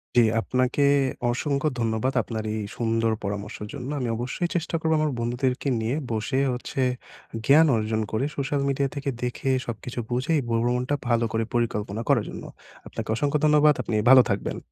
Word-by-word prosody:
জি, 120 - +7 0.2
আপনাকে 125 +4 0 0.5
অসংখ্য 140 +3 -1
ধন্যবাদ, 115 +3 0
আপনার 110 -2 -5
এই 110 - -2 0.2
সুন্দর 115 -1 +1
পরামর্শের 100 +1 -5
জন্য। 135 -2 -6
আমি 125 - -2
অবশ্যই 130 +9 -2
চেষ্টা 165 0 -1
করব 160 0 0
আমার 155 -1 +1
বন্ধুদেরকে 125 +3 -1
নিয়ে 115 +5 -1 0.2
বসে 115 +5 -1
হচ্ছে, 125 +2 -4 0.6
জ্ঞান 155 +4 +6
অর্জন 110 0 -1
করে, 110 +5 0
সোশ্যাল 140 0 -1
মিডিয়া 140 0 0
থেকে 140 0 -2
দেখে 125 +2 -2 0.2
সবকিছু 120 +2 -6
বুঝে 130 +7 0
ভ্র 115 -1 +1
ভ্রমণটা 125 +3 0
ভালো 115 -1 +2
করে 115 0 +1
পরিকল্পনা 110 -3 -1
করার 120 -7 +3
জন্য। - - -8 0.4
আপনাকে - - -6
অসংখ্য 145 +4 +1
ধন্যবাদ। 150 0 +5
আপনি 110 - -2
ভালো 130 -1 +10
থাকবেন। 100 -1 -2
125 Hz, 165 wpm, -25 LUFS, 115-140 Hz, 0.6 s, ভালো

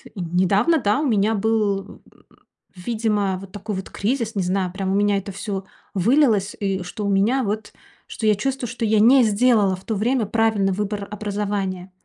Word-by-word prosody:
недавно, 190 - +2
да, 210 +1 +1
у 305 - -1
меня 215 -2 +2
был, 210 -2 -1
э, - - -24 0.2
э, - - -23 0.4
видимо, 205 -1 -1
вот 195 0 -11
такой 205 +1 -5
вот 190 0 -6
кризис. 230 +1 -2
Не 195 - 0
знаю, 185 0 -1
прям 190 -1 -2
у - - +1
меня 205 0 +2
это 195 +1 -5
всё 195 -1 -5 0.3
вылилось. 215 - +2
И 195 -2 -1
что 205 +4 -6
у 200 - 0
меня 220 +7 +2
вот 215 +1 -4 0.3
что 220 - -5
я 210 - +5
чувствую, 260 +3 -2
что 230 +1 -5
я 215 0 +3
не 250 +4 +6
сделала 215 -2 +3
в 185 - -15
то 220 - -2
время 230 +3 +1
правильный 215 -2 +1
выбор 205 0 -3
образования. 200 -3 -3
205 Hz, 190 wpm, -22 LUFS, 195-225 Hz, 0.4 s, не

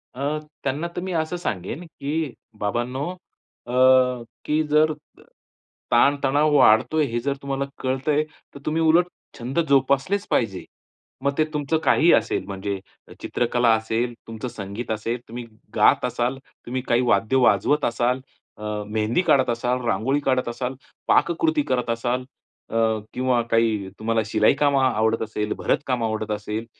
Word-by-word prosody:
अ, 130 - -7 0.4
त्यांना 145 +5 -1
तर - - -2
मी 185 +1 -4
असं 160 +1 -1
सांगेन, 110 - -4
की 155 -2 -3 0.3
बाबांनो, 120 +8 -2 0.6
अ, 120 - -6 0.7
की 150 +1 +1
अ, - - -1
जर 155 +1 +4 1.0
ताणतणाव 145 +4 +3
वाढतोय 140 +5 +5
हे 120 -3 -2
जर 140 +4 -1
तुम्हाला 140 0 -2 0.2
कळतंय, 135 +3 +1 0.3
तर - - -8
तुम्ही 160 +2 0
उलट 165 +2 +4 0.3
छंद 125 +7 -2
जोपासलेच 140 +9 +2
पाहिजे. 100 -6 0 0.6
मग 140 - +2
ते 155 - +3
तुमचं 150 +1 0
काहीही 170 - +5
असेल, 115 - +1
म्हणजे 100 0 -4 0.4
चित्रकला 120 0 +1
असेल, 110 +2 -1
तुमचं 115 +2 -5
संगीत 105 +1 -6
असेल, 115 +3 -2
तुम्ही 120 +1 -7 0.3
गात - - +4
असाल, 125 +2 -1 0.3
तुम्ही 130 +2 -3
काही 120 +1 +3
वाद्य 120 +1 +2
वाजवत 145 +3 +3
असाल, 120 +2 +1 0.4
अ, 105 - -11 0.2
मेहंदी 110 +8 +1
काढत 130 -3 +4
असाल, 125 +2 0
रांगोळी 130 +4 +1
काढत 130 -2 +1
असाल, 125 +2 -4 0.3
पाककृती 300 - +3
करत 125 -2 0
असाल, 120 +2 -1 0.5
अ, - - -6 0.4
किंवा 125 -1 +1
काही 110 -4 +2
तुम्हाला 115 +1 +1
शिलाई 110 0 +3
काम 145 -1 +3
आवडत 115 -4 +2
असेल, 105 -1 -3
भरत - - +1
काम 125 -3 0
आवडत 110 -1 -2
असेल, 105 +2 -3
125 Hz, 145 wpm, -23 LUFS, 115-145 Hz, 1.0 s, वाढतोय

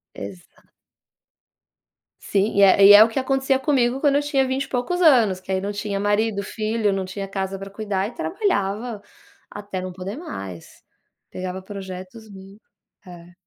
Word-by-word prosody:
Exa 100 -3 -10 1.6
Sim, 200 +2 0
e 200 - +4
é 195 0 +6
e 205 - +10
é 205 +1 +10
o 225 - +1
que 225 - -2
acontecia 270 0 +1
comigo 265 -3 +1
quando 285 -1 +2
eu 285 - +3
tinha 280 -2 +1
20 260 +1 -1
e - - -12
poucos 265 +9 -2
anos, 235 - +4
que 190 - -8
aí 190 - +1
não 200 +1 -3
tinha 205 -1 -3
marido, 205 +1 0
filho, 215 0 -1
não 195 -1 -2
tinha 195 +1 -6
casa 195 0 -4
pra 195 0 -8
cuidar 200 -1 -3
e 235 - -10
trabalhava 230 - -2 0.5
até 200 -2 -6
não 185 - -5
poder 185 +3 -7
mais. 95 - -9 0.5
Pegava 185 0 -6
projetos 190 +2 -9
mi 195 +1 -13 0.5
É. 175 -1 -13
205 Hz, 170 wpm, -22 LUFS, 190-245 Hz, 1.6 s, e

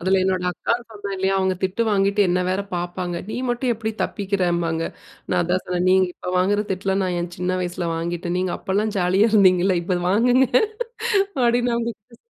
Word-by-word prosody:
அதில 190 +2 +2
என்னோட 185 -1 0
அக்கான்னு 235 +7 -2
சொன்னேன் 205 -2 -5
இல்லையா? 190 +1 +1
அவங்க 190 0 +1
திட்டு 190 +4 0
வாங்கிட்டு 200 0 +2
என்ன 180 +1 +1
வேற 190 +2 0
பார்ப்பாங்க. 175 0 -3
நீ - - -4
மட்டும் 240 +1 0
எப்படி 220 0 -3
தப்பிக்கிறம்பாங்க. 175 -5 -1 0.5
நான் - - +2
அதான் 180 +2 0
சொன்னேன், 180 0 -1
"நீங்க 190 0 +4
இப்போ - - -6
வாங்குற 205 +3 +2
திட்டலாம் 195 +1 -1
நான் 180 -1 -1
என் 175 0 -5
சின்ன 185 +1 -1
வயசுல 175 -1 -3
வாங்கிட்டேன். 170 +1 -3
நீங்க 185 -1 -1
அப்போலாம் 205 +3 -1
ஜாலியா 185 +4 +3
இருந்தீங்கல்ல, 185 -3 +4
இப்போ 180 +1 -1
வாங்குங்க" 245 +5 +4 1.0
அப்படின்னு 240 +1 +2
அவங்ககிட்ட 235 0 -5
190 Hz, 170 wpm, -22 LUFS, 180-210 Hz, 1.0 s, நீங்க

